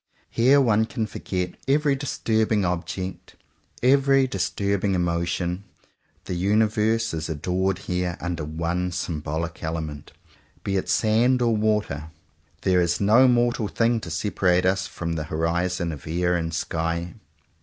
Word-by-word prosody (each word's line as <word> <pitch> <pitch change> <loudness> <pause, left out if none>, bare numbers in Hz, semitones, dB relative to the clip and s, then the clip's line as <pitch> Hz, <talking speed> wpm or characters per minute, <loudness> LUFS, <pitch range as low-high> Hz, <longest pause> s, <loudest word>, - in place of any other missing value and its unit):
Here 130 +5 +5
one 110 -4 +3
can 115 -3 -2
forget 90 -3 -4
every 145 +1 +3
dis 140 0 -4
turbing 110 -2 +2
object, 90 +1 -4 0.5
every 135 +1 +4
disturbing 100 -2 -1
emotion. 85 +1 -1 0.6
The 95 - -4
universe 110 +4 +1
is 80 0 -3
adored 90 +5 -1
here 90 -1 -2
under 85 -3 -3
one 85 +4 -2
symbolic 80 -1 -3
element, 80 -3 -5 0.5
be 100 -2 -1
it 95 - -1
sand 120 +4 +3
or 120 -2 +2
water, 105 -9 0
and 80 - -14 0.5
there 90 -1 +3
is 85 0 +1
no 110 +6 +5
mortal 120 -3 +2
thing 115 +3 +1
to 90 - -8
separate 90 +1 +1
us 95 +1 +1
from 85 -1 -4
the 80 -2 -3
horizons 85 +2 -1
of 75 - -10
air 90 +2 +1
and 80 -1 -2
sky. 85 +1 -2
90 Hz, 140 wpm, -24 LUFS, 85-110 Hz, 0.6 s, Here